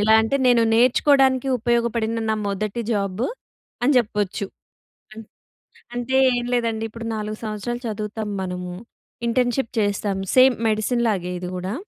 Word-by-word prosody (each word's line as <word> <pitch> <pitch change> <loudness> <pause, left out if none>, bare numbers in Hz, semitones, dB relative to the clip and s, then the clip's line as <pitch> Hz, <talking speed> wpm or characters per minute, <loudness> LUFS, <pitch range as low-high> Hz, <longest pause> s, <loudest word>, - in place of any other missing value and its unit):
ఎలా 220 +1 +5
అంటే, 225 +5 +1
నేను 240 -2 +5
నేర్చుకోడానికి 260 +2 +4
ఉపయోగపడిన 235 -1 0
నా 220 - +2
మొదటి 210 +3 -2
జాబ్ 200 0 -1 0.6
అని 265 +4 +4
జెప్పొచ్చు. 210 -4 0 0.7
అన్ 225 +1 -9 0.7
అంటే, 245 +2 -2 0.2
ఏం 240 0 -2
లేదండి. 230 -2 0
ఇప్పుడు 230 +1 -7
4 215 0 -4
సంవత్సరాలు 220 +3 -4
చదువుతాం 215 0 -4
మనము. 180 -1 -4 0.5
ఇంటర్న్‌షిప్ 245 +1 0
చేస్తాం, 205 -1 0 0.2
సేమ్ 255 -1 +7
మెడిసిన్‌లాగే 215 -4 0
ఇది 180 0 -5
గూడా. 185 +3 -4
220 Hz, 125 wpm, -22 LUFS, 205-240 Hz, 0.7 s, సేమ్